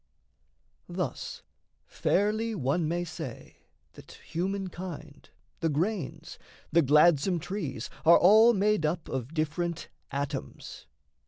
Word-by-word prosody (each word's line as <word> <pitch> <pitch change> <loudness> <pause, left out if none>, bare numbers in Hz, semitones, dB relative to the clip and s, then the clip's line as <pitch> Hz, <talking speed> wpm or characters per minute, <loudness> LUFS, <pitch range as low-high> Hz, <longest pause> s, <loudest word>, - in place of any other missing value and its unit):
Thus - - -4 0.4
fairly 215 +3 0
one 155 +2 0
may 175 +2 -1
say 160 -7 -8 0.4
that - - -14
humankind, 180 -4 -5 0.3
The 165 - 0
grains, 170 +2 -3 0.3
the 170 - +5
gladsome 150 +4 +4
trees, 155 - -4 0.2
are 165 +1 +8
all 220 +5 +7
made 205 -2 +2
up 160 +2 -1
Of 130 +4 -5
different 165 +2 -2 0.2
atoms. 140 0 -5
170 Hz, 100 wpm, -28 LUFS, 150-190 Hz, 0.4 s, are